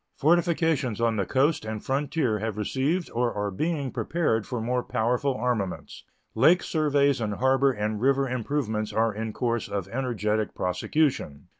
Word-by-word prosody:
Fortifications 160 Hz, -, +2 dB
on 115 Hz, -1 st, +2 dB
the 100 Hz, -3 st, -1 dB
coast 140 Hz, +4 st, +2 dB
and 110 Hz, -1 st, -5 dB
frontier 135 Hz, -4 st, 0 dB
have 110 Hz, 0 st, -3 dB
received 140 Hz, -, -1 dB
or 120 Hz, 0 st, 0 dB
are 105 Hz, 0 st, -2 dB
being 145 Hz, -, -2 dB
prepared 150 Hz, -11 st, -1 dB
for 125 Hz, -, -3 dB
more 125 Hz, +2 st, 0 dB
powerful 125 Hz, +3 st, 0 dB
armaments; 110 Hz, -5 st, -3 dB, 0.3 s
lake 160 Hz, +10 st, +4 dB
surveys 145 Hz, -4 st, +2 dB
and 105 Hz, -2 st, -2 dB
harbor 135 Hz, +2 st, +3 dB
and 105 Hz, -2 st, -3 dB
river 135 Hz, +1 st, +2 dB
improvements 120 Hz, -4 st, -2 dB
are 115 Hz, -1 st, +1 dB
in 110 Hz, +1 st, -4 dB
course 120 Hz, -1 st, -1 dB
of 100 Hz, -2 st, -3 dB
energetic 110 Hz, -4 st, -1 dB
prosecution. 90 Hz, -, -1 dB
125 Hz, 150 wpm, -26 LUFS, 110-140 Hz, 0.3 s, lake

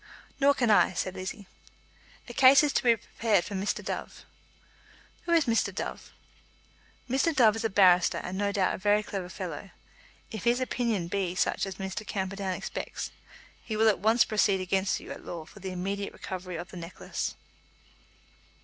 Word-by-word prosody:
"Nor 280 Hz, 0 st, +5 dB
can 240 Hz, -5 st, +2 dB
I," 205 Hz, -, +5 dB
said 185 Hz, +1 st, -2 dB
Lizzie. 190 Hz, +3 st, -6 dB, 0.8 s
"A 240 Hz, -, -8 dB
case 265 Hz, +3 st, +7 dB
is 295 Hz, -, +1 dB
to -, -, +2 dB
be 235 Hz, -2 st, +5 dB
prepared 215 Hz, -3 st, 0 dB
for -, -, -7 dB
Mr. 195 Hz, +1 st, -2 dB
Dove." -, -, -5 dB, 1.0 s
"Who 340 Hz, -, -2 dB
is 330 Hz, -3 st, +4 dB
Mr. 230 Hz, -2 st, +1 dB
Dove?" -, -, -6 dB, 1.0 s
"Mr. 270 Hz, +6 st, +1 dB
Dove 225 Hz, -5 st, +5 dB
is 225 Hz, -, -4 dB
a 225 Hz, -, +1 dB
barrister, 185 Hz, -3 st, +5 dB
and 185 Hz, -, -5 dB
no 200 Hz, +1 st, 0 dB
doubt 195 Hz, -2 st, +1 dB
a -, -, -5 dB
very 205 Hz, +2 st, +3 dB
clever 190 Hz, -4 st, -5 dB
fellow. -, -, -6 dB, 0.6 s
If 220 Hz, -4 st, -6 dB
his 240 Hz, +1 st, +3 dB
opinion 235 Hz, -8 st, -1 dB
be 185 Hz, -1 st, -2 dB
such 195 Hz, -, 0 dB
as 190 Hz, -, -6 dB
Mr. 190 Hz, +2 st, -5 dB
Camperdown 195 Hz, -2 st, -3 dB
expects, -, -, -5 dB, 0.5 s
he 215 Hz, -, -4 dB
will 220 Hz, 0 st, +5 dB
at 210 Hz, -, +1 dB
once 225 Hz, +3 st, +4 dB
proceed 205 Hz, -2 st, +2 dB
against 190 Hz, +1 st, 0 dB
you -, -, -10 dB
at -, -, -8 dB
law 165 Hz, -2 st, -6 dB
for 205 Hz, -, -15 dB
the 190 Hz, 0 st, -5 dB
immediate 195 Hz, +2 st, -3 dB
recovery 185 Hz, -1 st, -6 dB
of 175 Hz, +3 st, -7 dB
the -, -, -9 dB
necklace." 170 Hz, +1 st, -5 dB
200 Hz, 175 wpm, -28 LUFS, 185-230 Hz, 1.0 s, case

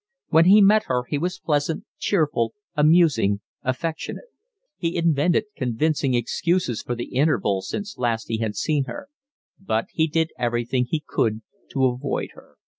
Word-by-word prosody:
When 165 Hz, +1 st, +5 dB
he 200 Hz, +4 st, +7 dB
met 210 Hz, +2 st, +5 dB
her 125 Hz, -1 st, 0 dB
he 145 Hz, -, -1 dB
was 180 Hz, +4 st, -2 dB
pleasant, 150 Hz, +1 st, -1 dB, 0.2 s
cheerful, 150 Hz, -, 0 dB, 0.2 s
amusing, 150 Hz, -, +4 dB, 0.2 s
affectionate; 160 Hz, -, -4 dB, 0.5 s
he 165 Hz, -1 st, -2 dB
invented 170 Hz, +3 st, +2 dB
convincing 135 Hz, +2 st, 0 dB
excuses 125 Hz, +2 st, 0 dB
for 120 Hz, -, -3 dB
the 120 Hz, -, -6 dB
interval 115 Hz, -9 st, +2 dB
since 205 Hz, -, -6 dB
last 115 Hz, -2 st, -1 dB
he 115 Hz, -, -1 dB
had 110 Hz, -2 st, -2 dB
seen 150 Hz, -4 st, 0 dB
her; 285 Hz, -, -8 dB, 0.5 s
but 115 Hz, -12 st, -1 dB
he 160 Hz, 0 st, +1 dB
did 160 Hz, +1 st, 0 dB
everything 120 Hz, +1 st, 0 dB
he 155 Hz, -2 st, -1 dB
could 110 Hz, 0 st, 0 dB, 0.3 s
to 135 Hz, -1 st, +2 dB
avoid 130 Hz, +2 st, -1 dB
her. -, -, -18 dB
145 Hz, 150 wpm, -23 LUFS, 120-165 Hz, 0.5 s, he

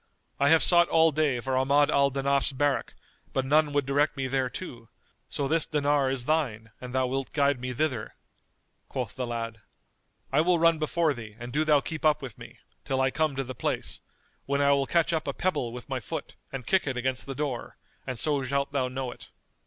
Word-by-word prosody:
I 140 Hz, +1 st, +4 dB
have 160 Hz, +1 st, +6 dB
sought 175 Hz, -1 st, +5 dB
all 160 Hz, 0 st, +5 dB
day 150 Hz, -4 st, +1 dB
for 130 Hz, +1 st, -2 dB
Ahmad 140 Hz, +3 st, +3 dB
al 140 Hz, 0 st, +4 dB
Danaf's 140 Hz, +1 st, +1 dB
barrack, 140 Hz, +1 st, 0 dB, 0.4 s
but 135 Hz, -, 0 dB
none 150 Hz, +2 st, +3 dB
would 145 Hz, -1 st, +1 dB
direct 145 Hz, +2 st, +1 dB
me 135 Hz, -, -1 dB
thereto; 130 Hz, -1 st, -3 dB, 0.4 s
so 140 Hz, -, -2 dB
this 160 Hz, +2 st, +1 dB
dinar 145 Hz, -2 st, +2 dB
is 130 Hz, -2 st, -2 dB
thine 125 Hz, -8 st, -1 dB
an 125 Hz, -1 st, -7 dB
thou 130 Hz, 0 st, +1 dB
wilt 135 Hz, +1 st, -3 dB
guide 140 Hz, -2 st, +2 dB
me 125 Hz, 0 st, -3 dB
thither." 125 Hz, -4 st, -2 dB, 0.7 s
Quoth -, -, -4 dB
the 125 Hz, -1 st, -3 dB
lad, 115 Hz, -2 st, -4 dB, 0.7 s
"I -, -, +4 dB
will 175 Hz, +1 st, +3 dB
run 165 Hz, -1 st, +4 dB
before 155 Hz, 0 st, +1 dB
thee 110 Hz, -4 st, -9 dB
and 120 Hz, +1 st, -8 dB
do 150 Hz, +3 st, +2 dB
thou 150 Hz, -2 st, +4 dB
keep 160 Hz, +2 st, -5 dB
up 155 Hz, -1 st, +4 dB
with 130 Hz, -6 st, -8 dB
me, -, -, -12 dB, 0.3 s
till 135 Hz, -1 st, -1 dB
I 130 Hz, 0 st, +2 dB
come 155 Hz, -2 st, 0 dB
to 135 Hz, -, -1 dB
the 130 Hz, 0 st, -6 dB
place, -, -, -3 dB, 0.5 s
when 140 Hz, +1 st, +1 dB
I 140 Hz, 0 st, +4 dB
will 140 Hz, -1 st, +2 dB
catch 170 Hz, 0 st, +2 dB
up 160 Hz, -2 st, -1 dB
a 140 Hz, -, -1 dB
pebble 145 Hz, -10 st, -1 dB
with 125 Hz, +1 st, -9 dB
my 135 Hz, -2 st, -2 dB
foot[FN#224] 110 Hz, -, -6 dB, 0.2 s
and 135 Hz, -3 st, -6 dB
kick 190 Hz, -5 st, +2 dB
it 130 Hz, -2 st, -2 dB
against 130 Hz, +1 st, -2 dB
the 135 Hz, -, -5 dB
door; 135 Hz, -4 st, -4 dB, 0.3 s
and 130 Hz, -2 st, -3 dB
so 145 Hz, +1 st, 0 dB
shalt 140 Hz, +2 st, -1 dB
thou 135 Hz, -2 st, 0 dB
know 130 Hz, 0 st, -4 dB
it." -, -, -13 dB
140 Hz, 215 wpm, -27 LUFS, 130-150 Hz, 0.7 s, have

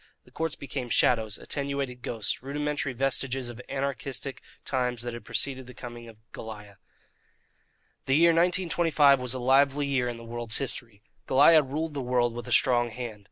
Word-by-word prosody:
The -, -, -20 dB
courts 160 Hz, -2 st, -2 dB
became 135 Hz, -3 st, -5 dB
shadows, 110 Hz, -2 st, +2 dB
attenuated 140 Hz, -3 st, -4 dB
ghosts, 115 Hz, -4 st, -2 dB
rudimentary 145 Hz, +1 st, -2 dB
vestiges 130 Hz, 0 st, -1 dB
of 120 Hz, -, -9 dB
the 125 Hz, -, -11 dB
anarchistic 140 Hz, 0 st, -3 dB, 0.2 s
times 125 Hz, -3 st, -1 dB
that 120 Hz, -1 st, -4 dB
had 120 Hz, -2 st, -8 dB
preceded 130 Hz, +3 st, -2 dB
the 125 Hz, -, -12 dB
coming 120 Hz, -1 st, -9 dB
of 115 Hz, -2 st, -13 dB, 0.2 s
Goliah. 105 Hz, -3 st, -9 dB, 1.3 s
The 135 Hz, -, +3 dB
year 170 Hz, +1 st, +6 dB
1925 165 Hz, -4 st, +3 dB
was 125 Hz, 0 st, -1 dB
a -, -, -3 dB
lively 135 Hz, +3 st, +3 dB
year 130 Hz, -3 st, 0 dB
in 120 Hz, -, -5 dB
the 115 Hz, -, -11 dB
world's 115 Hz, -1 st, -2 dB
history. 115 Hz, -6 st, -4 dB, 0.2 s
Goliah 150 Hz, +4 st, +7 dB
ruled 150 Hz, +3 st, -3 dB
the 140 Hz, -, -3 dB
world 125 Hz, -1 st, +1 dB
with 120 Hz, +1 st, -7 dB
a -, -, -6 dB
strong 120 Hz, 0 st, +4 dB
hand. 115 Hz, -2 st, -6 dB
130 Hz, 170 wpm, -27 LUFS, 120-140 Hz, 1.3 s, Goliah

